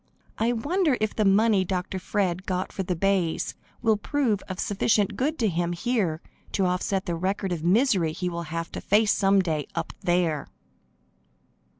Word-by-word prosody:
I 225 +2 +2
wonder 295 +4 +1
if 215 0 -1
the 215 - +1
money 200 0 +4
Dr. 185 +1 -3
Fred 185 -1 -1
got 185 0 -2
for - - -4
the 180 -1 -2
bays 185 -2 0 0.3
will 220 -2 +3
prove 230 -3 0
of 185 - -5
sufficient 205 0 +1
good 295 +9 -1
to 225 - +1
him 175 -1 -1
here 180 -4 -1 0.3
to 195 - +2
offset 185 +2 0
the 175 - -2
record 190 +3 -1
of 165 -3 -3
misery 185 - +3
he 180 +3 -3
will 170 -1 -3
have 165 +1 -4
to - - -6
face 210 +1 +3
some 195 -1 +3
day 155 -5 -2
up 165 -1 -3
there! 175 -5 +1
190 Hz, 175 wpm, -26 LUFS, 175-215 Hz, 0.3 s, money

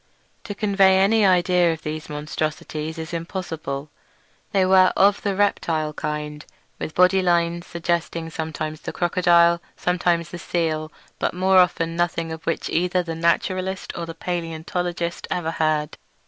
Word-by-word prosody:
To 205 - -5
convey 195 -2 +4
any 210 +3 +4
idea 180 -1 +3
of 160 -1 -6
these 155 0 -5
monstrosities 155 +1 -4
is 160 +1 -6
impossible. 160 -4 -5 0.6
They 190 -2 +3
were 185 0 +6
of 200 +1 +4
the 200 -2 -1
reptile 165 -6 0
kind, 150 0 -4 0.4
with 155 - -5
body 180 +1 +5
lines 170 -1 +1
suggesting 170 -1 -2
sometimes 155 -1 -4
the - - -6
crocodile, 170 -1 +3 0.2
sometimes 175 -1 0
the 175 - -6
seal, 160 -3 -2 0.3
but - - -1
more 190 +1 +3
often 165 -2 +2
nothing 170 -1 -1
of 160 0 -7
which 165 - -1
either 180 +2 +1
the 165 -1 -4
naturalist 185 +3 -1
or 170 -1 -4
the 165 - -7
palaeontologist 170 0 -3
ever 165 -2 -1
heard. 155 -2 -1
170 Hz, 145 wpm, -23 LUFS, 160-180 Hz, 0.6 s, were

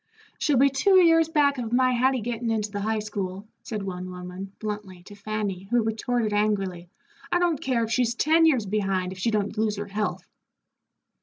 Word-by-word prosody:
"She'll 290 -4 +2
be 275 +2 +5
two 380 +9 +3
years 330 -2 +5
back 285 -4 +2
of 230 -2 -4
my 255 +1 +3
Hattie 255 +1 +2
gettin' 235 +1 -3
into 215 -2 -1
the 205 - -4
high 220 +2 0
school," 200 -1 -5
said 215 -3 -5
one 185 -1 -5
woman, 180 +2 -8
bluntly, 205 -4 -6
to 205 - -13
Fanny, 205 -2 -4
who 240 -1 +2
retorted, 225 0 -1
angrily, 195 -4 -1 0.4
"I - - +3
don't 345 -4 +1
care 250 -3 0
if 225 - -4
she's 235 -1 +1
ten 320 +5 +4
years 260 -9 +2
behind, 195 -2 -1
if 190 - -9
she 230 - +1
don't 210 -1 -1
lose 215 -1 +1
her 205 0 -4
health." 210 +1 -3
215 Hz, 190 wpm, -25 LUFS, 200-250 Hz, 0.4 s, be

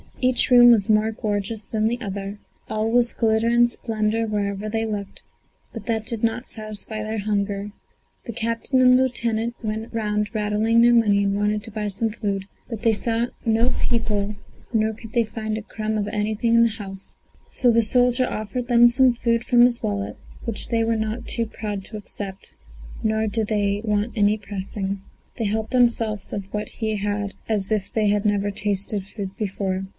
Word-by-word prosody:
Each 255 -1 +3
room 240 -1 +9
was 220 -2 +3
more 215 +1 +3
gorgeous 210 -1 -3
than 215 0 0
the 240 +2 -1
other; 200 -1 -5 0.3
all 215 +1 -1
was 240 0 +3
glitter 220 0 +2
and 240 0 +5
splendour 225 -1 -1
wherever 205 -1 -2
they 225 +1 -1
looked; 205 -3 -5 0.5
but 225 -3 -7
that 220 -2 -1
did 230 -1 -4
not 230 +3 0
satisfy 215 0 -6
their 215 +1 -3
hunger. 200 0 -2 0.5
The 235 - -5
captain 230 +4 0
and 250 0 +7
the 260 - +4
lieutenant 235 -2 0
went 220 +1 -3
round 210 -1 -1
rattling 215 +2 +2
their 240 0 +6
money, 205 -4 +4
and 200 0 +1
wanted 210 +1 0
to 225 - -7
buy 210 0 -3
some 205 +3 -1
food; 200 -3 -3 0.2
but 225 -4 -6
they 225 -2 +4
saw 230 +2 0 0.2
no 230 +2 +3
people 210 -3 0 0.4
nor 220 0 +2
could 225 0 -12
they 235 - +3
find 215 0 -4
a - - -4
crumb 215 0 -3
of 205 -1 -1
anything 215 +2 0
in 230 - +6
the 230 - +4
house, 195 -3 -9 0.3
so 245 - +3
the 230 0 +4
soldier 250 +2 +3
offered 215 +3 -4
them 240 -1 +7
some 255 +1 +4
food 235 0 0
from 245 -1 +4
his 240 -1 +4
wallet, 100 0 -2 0.3
which 230 -3 -1
they 230 -1 +2
were 225 0 +1
not 220 +2 -3
too 230 - +2
proud 210 -3 -5
to 215 - -7
accept, 200 -2 -7 0.5
nor 220 0 +1
did 215 0 +1
they 205 -1 0
want 210 +1 0
any 210 0 +3
pressing. 195 -1 -5 0.4
They 230 - -1
helped 220 +2 -1
themselves 230 -5 +2
of 195 -1 -5
what 210 0 -3
he 220 -2 -2
had 205 0 -2 0.2
as 210 -2 +1
if 210 -3 0
they 215 -2 +2
had 205 0 +1
never 205 -1 +1
tasted 200 0 0
food 195 -1 -7
before. 195 -2 -2
215 Hz, 190 wpm, -23 LUFS, 205-230 Hz, 0.5 s, room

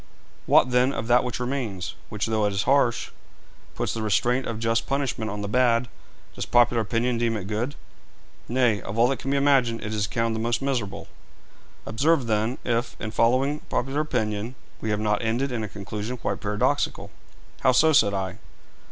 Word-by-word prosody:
'What, 125 - +5
then, 125 +2 +3
of 115 - -3
that 125 +1 +5
which 125 -2 -3
remains, 120 -8 -3 0.2
which, 105 -1 -2
though 110 -2 +1
it 100 - -2
is 100 - 0
harsh, 135 -4 +2 0.6
puts - - -2
the 115 - -3
restraint 120 +4 +1
of 115 - -3
just 115 0 0
punishment 135 -6 -1
on 105 0 -4
the 100 - -3
bad 120 +1 +2 0.5
does - - -5
popular 120 -1 +4
opinion 115 +3 0
deem 115 -1 +1
it 95 - -6
good?' 110 +7 -2 0.7
'Nay; 120 -4 +2
of 100 - -6
all 120 +1 +5
that 135 - -1
can 135 - -4
be 140 - +2
imagined, 135 -5 +2
it 110 - -4
is 105 -1 0
accounted 115 +2 -1
the - - -2
most 115 +1 0
miserable.' 130 -7 -3 0.8
'Observe, 140 +4 +2
then, 110 +2 0
if, 120 0 -1
in 110 - -4
following 130 +6 +2
popular 135 +4 -1
opinion, 115 -4 -2 0.3
we 110 - -2
have 105 -1 0
not 105 -1 0
ended 120 +4 0
in 120 -3 -2
a 105 - -4
conclusion 105 +5 -5
quite - - -3
paradoxical.' 105 0 0 0.5
'How 130 - +4
so?' 155 +5 +4
said 100 -8 +4
I. 95 -2 -3
115 Hz, 185 wpm, -25 LUFS, 110-125 Hz, 0.8 s, What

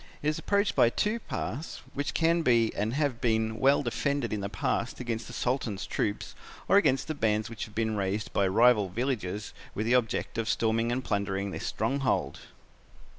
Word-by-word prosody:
It 150 - +2
is 155 - -2
approached 200 0 +1
by 115 - +5
two 210 - 0
paths, 155 - -5
which 145 +1 -3
can 165 +1 +3
be 120 -6 +3
and 110 +4 -1
have 140 -5 0
been 110 -1 +1
well 140 +2 +4
defended 125 0 -1
in 105 - -2
the 100 - -3
past 115 +3 -2
against 115 -2 -3
the - - -9
Sultan's 120 -5 -1
troops 105 0 -2 0.3
or 200 - +5
against 135 -10 +3
the 155 - -1
bands 110 -5 0
which 115 - -5
have 105 - -16
been 110 -1 0
raised 100 +2 -2
by 100 - +2
rival 105 0 +4
villages 105 -2 -3 0.2
with 105 - -1
the 120 - +2
object 120 -2 0
of 115 0 -1
storming 115 +1 +1
and 130 +2 -1
plundering 100 -1 -1
this - - -4
stronghold. 135 +5 0
115 Hz, 185 wpm, -29 LUFS, 105-135 Hz, 0.3 s, by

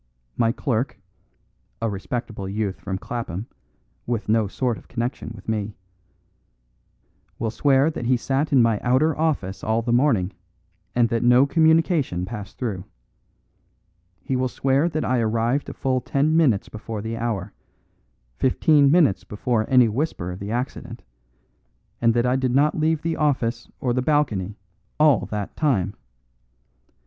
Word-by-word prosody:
My 115 -1 +2
clerk 125 0 -2 0.8
(a 115 - -1
respectable 105 0 -4
youth 100 -1 -2
from 95 -1 -3
Clapham, 110 -2 -5 0.6
with 115 -3 -2
no 110 -1 +3
sort 120 +3 -2
of - - -21
connection 120 0 -4
with 100 - -14
me) 105 -1 -2 1.6
will 115 -1 -2
swear 140 +4 +3
that 120 -6 -4
he 125 0 +3
sat 135 +5 -1
in 130 -4 +5
my 115 -3 +2
outer 135 +5 +2
office 145 - -1
all 110 +1 0
the 120 0 0
morning, 115 -8 +2 0.6
and 120 -1 +3
that 115 0 0
no 125 +2 +5
communication 160 - +2
passed 105 -1 -8
through. 105 -8 -3 1.4
He 135 - -1
will 130 0 +1
swear 135 +5 +1
that 155 -1 -2
I 125 -1 +1
arrived 115 +4 0
a - - -6
full 130 -1 0
ten 145 +5 +1
minutes 135 -12 +3
before 110 -1 -6
the 110 +1 -3
hour, 110 -4 -3 0.8
fifteen 140 - +4
minutes 150 - +4
before 110 +1 -1
any 125 -3 +6
whisper 110 - -2
of 90 - -7
the 100 - -6
accident, 125 +4 -4 1.0
and 115 0 +3
that 120 0 +2
I 125 +1 +2
did 130 -1 0
not 145 +2 +4
leave 155 -1 0
the 165 0 -1
office 135 -6 0
or 125 -2 0
the 130 - +1
balcony 115 -9 0 0.4
all 150 -5 +4
that 105 -2 -4
time. 100 - +1
120 Hz, 150 wpm, -23 LUFS, 110-140 Hz, 1.6 s, any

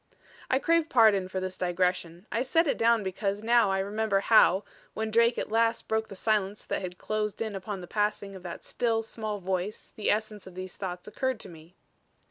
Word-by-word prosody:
I 260 - +3
crave 330 +3 +2
pardon 215 -6 +5
for 185 0 -3
this 185 0 -5
digression. 180 0 -1
I 230 - 0
set 325 +6 +2
it 285 - 0
down 230 -1 +4
because 195 +2 -2
now 230 -2 +4
I 195 - +1
remember 200 +1 0
how, 200 -3 +5 0.3
when 220 0 -2
Drake 230 +2 +4
at - - -3
last 230 +1 +1
broke 220 0 0
the 195 - -9
silence 210 0 0
that - - -2
had 180 -1 -6
closed 215 -1 -2
in 220 -2 -3
upon 195 0 -5
the - - -7
passing 205 -1 -1
of 190 - -9
that 175 -1 -7
still, 225 -2 0
small 215 -2 -4
voice 190 +2 -3
the 215 - -1
essence 210 -2 -1
of 185 - -12
these 185 0 -6
thoughts 180 -1 -6
occurred 260 +2 -2
to - - -8
me. 165 +1 -14
210 Hz, 205 wpm, -28 LUFS, 185-225 Hz, 0.3 s, pardon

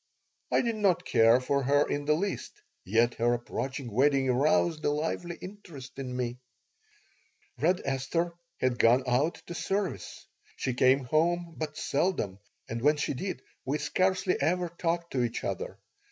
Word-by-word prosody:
I - - +4
did 230 -3 -1
not 185 -4 +2
care 115 +2 +5
for 140 +2 0
her 145 +2 +3
in 145 0 -2
the 150 +1 +3
least, 195 +5 -4 0.2
yet 115 +5 +2
her 120 +1 +3
approaching 125 +1 -4
wedding 135 +2 +3
aroused 155 +5 +2
a - - +2
lively 160 +3 -2
interest 170 -10 -10
in 125 -2 -4
me 125 0 -2 1.2
Red 180 +3 +2
Esther 140 +6 -1 0.3
had 130 -1 0
gone 120 +3 +5
out 130 +7 +2
to - - -6
service. 195 +2 -3 0.3
She 130 - -2
came 130 +2 +4
home 170 +5 +1
but 150 -1 -5
seldom, 140 - 0 0.3
and 115 +1 -4
when 150 +3 +4
she 145 - -1
did 140 0 -4 0.2
we 140 +3 -1
scarcely 185 +5 +1
ever 175 +1 +1
talked 170 0 -2
to 130 - 0
each 120 - -2
other. 475 +1 -4
145 Hz, 155 wpm, -29 LUFS, 125-175 Hz, 1.2 s, care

